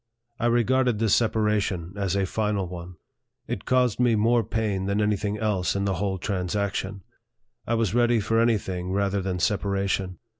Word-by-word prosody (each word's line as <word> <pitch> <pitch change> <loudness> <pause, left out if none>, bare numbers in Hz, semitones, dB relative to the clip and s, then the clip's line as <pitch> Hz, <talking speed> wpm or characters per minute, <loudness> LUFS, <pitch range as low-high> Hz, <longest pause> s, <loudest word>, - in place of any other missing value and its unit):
I 120 - +1
regarded 120 0 +2
this 110 -2 +2
separation 105 -6 +1
as 100 -2 -1
a 100 -1 +1
final 105 -1 -1
one. 90 0 -8 0.5
It - - -4
caused 125 -4 +2
me 120 -2 +4
more 115 +2 +3
pain 105 -3 -2
than 100 +1 0
any 105 0 +2
thing 105 +1 -3
else 105 -5 0
in 100 0 0
the 100 - +1
whole 95 -2 -1
transac 95 +2 -2
tion. 95 0 -4 0.6
I 115 - +1
was 115 -4 0
ready 120 -1 +3
for 115 +2 +1
any 115 -1 +3
thing 90 -2 -5
rather 100 0 0
than 95 -1 -2
separa 100 +1 0
tion. 95 -2 -2
100 Hz, 185 wpm, -25 LUFS, 95-115 Hz, 0.6 s, me